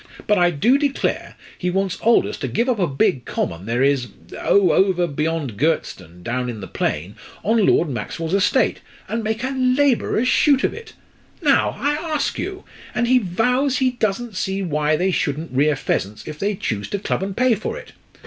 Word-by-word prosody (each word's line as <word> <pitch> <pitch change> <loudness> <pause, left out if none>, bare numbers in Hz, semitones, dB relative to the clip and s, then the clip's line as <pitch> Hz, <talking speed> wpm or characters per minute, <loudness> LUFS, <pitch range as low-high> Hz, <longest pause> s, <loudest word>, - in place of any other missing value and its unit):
But 210 -2 +3
I 175 0 +5
do 230 - +3
declare 285 -2 -1 0.2
he 180 - -2
wants 190 0 -1
Aldous 230 +1 +3
to - - -3
give 235 +3 0
up 245 -4 +1
a 180 - +2
big 135 -2 +1
common 85 -1 -3
there 120 +3 +1
is 135 -3 +2 0.3
oh! 200 -2 +3
over 185 -2 +3
beyond 155 -6 -2
Girtstone, 95 - -2
down 125 +3 -2
in 115 -3 -5
the 95 - -6
plain 85 +3 -3 0.3
on 220 0 +3
Lord 170 - +3
Maxwell's 155 - -4
estate, 195 0 +2 0.3
and 225 0 -2
make 220 +2 -2
a 260 - -1
labourers' 255 -2 +2
shoot 280 +1 +4
of - - +1
it! 455 -1 -10 0.5
Now, 280 -2 +3
I 285 +3 +1
ask 310 -1 -2
you! 385 +2 -5 0.3
And 240 - +1
he 255 +1 +5
vows 250 +8 +1
he 260 -2 +2
doesn't 230 -1 -2
see 195 +1 -2
why 150 -2 +1
they 185 +4 +1
shouldn't 155 -1 -2
rear 145 +3 +2
pheasants 105 -6 -3
if 155 0 -7
they 205 +1 0
choose 105 - -3
to - - -1
club 200 - -2
and 195 0 -4
pay 255 -1 +4
for 450 - -3
it. - - -11
190 Hz, 190 wpm, -21 LUFS, -, 0.5 s, I